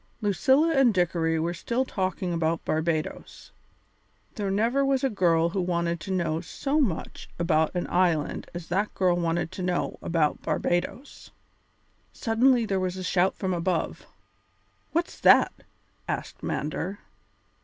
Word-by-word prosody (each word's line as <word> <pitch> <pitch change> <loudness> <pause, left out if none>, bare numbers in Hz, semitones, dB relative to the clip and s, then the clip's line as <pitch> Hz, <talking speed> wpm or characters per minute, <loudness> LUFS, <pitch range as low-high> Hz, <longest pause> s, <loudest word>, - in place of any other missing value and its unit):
Lucilla 265 - +3
and 270 -8 +4
Dickory 165 -2 +1
were 170 +2 -1
still 235 +9 -1
talking 185 -5 -2
about 165 0 -1
Barbadoes. 155 0 -3 0.8
There 205 -2 -3
never 230 +8 +2
was 275 -1 +1
a 270 - +2
girl 170 -4 +2
who 190 +2 -1
wanted 170 -1 -1
to 175 +5 -6
know 170 -3 0
so 275 - -2
much 195 - -3
about 160 -1 +1
an 180 - -1
island 175 -4 0
as 175 -1 -7
that 200 +4 -1
girl 180 -2 +2
wanted 170 -1 -1
to - - -7
know 180 -1 -1
about 160 -3 0
Barbadoes. 175 +10 -2 0.8
Suddenly 240 +1 +3
there 195 -3 0
was 185 0 -2
a 185 - -5
shout 185 +1 +2
from 190 -2 -2
above. 170 -1 -2 0.8
"What's 335 +4 -2
that?" - - +6 0.5
asked - - -4
Mander. 170 +6 -3
180 Hz, 140 wpm, -26 LUFS, 170-215 Hz, 0.8 s, that